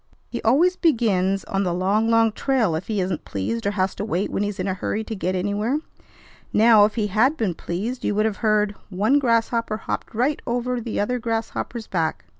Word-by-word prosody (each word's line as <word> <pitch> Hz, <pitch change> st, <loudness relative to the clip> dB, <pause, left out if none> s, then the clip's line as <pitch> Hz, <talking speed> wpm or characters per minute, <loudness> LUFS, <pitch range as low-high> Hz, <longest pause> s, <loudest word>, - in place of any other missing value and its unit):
He -, -, -4 dB
always 330 Hz, +11 st, +3 dB
begins 195 Hz, -, +2 dB
on 195 Hz, -, -2 dB
'The 175 Hz, -2 st, -1 dB
Long, 200 Hz, +5 st, +1 dB
Long 230 Hz, -1 st, +4 dB
Trail' 235 Hz, -6 st, +1 dB
if 160 Hz, +4 st, -3 dB
he 215 Hz, -2 st, -1 dB
isn't 180 Hz, -3 st, -2 dB
pleased 110 Hz, -, -3 dB
or -, -, +2 dB
has 185 Hz, 0 st, +1 dB
to -, -, -5 dB
wait 200 Hz, -2 st, -1 dB
when -, -, -1 dB
he's 205 Hz, -1 st, -2 dB
in 185 Hz, -, -1 dB
a 190 Hz, -, 0 dB
hurry 205 Hz, +3 st, -2 dB
to 220 Hz, -, -5 dB
get 185 Hz, -1 st, -2 dB
anywhere. 205 Hz, +8 st, 0 dB, 0.7 s
Now, 220 Hz, -1 st, +6 dB
if 210 Hz, -, -2 dB
he 220 Hz, -3 st, 0 dB
had 225 Hz, +9 st, +2 dB
been 205 Hz, -6 st, 0 dB
pleased, 205 Hz, +10 st, -4 dB
you 205 Hz, -, 0 dB
would 215 Hz, +1 st, +2 dB
have 220 Hz, -2 st, -1 dB
heard 210 Hz, -2 st, +2 dB, 0.2 s
'One 210 Hz, +9 st, +2 dB
grasshopper 230 Hz, -3 st, +1 dB
hopped 220 Hz, -, -5 dB
right 265 Hz, +6 st, +1 dB
over 245 Hz, +1 st, -1 dB
th' 225 Hz, -1 st, -4 dB
other 250 Hz, +5 st, 0 dB
grasshopper's 225 Hz, 0 st, -3 dB
back.' 160 Hz, -, -2 dB
215 Hz, 210 wpm, -23 LUFS, 190-230 Hz, 0.7 s, Now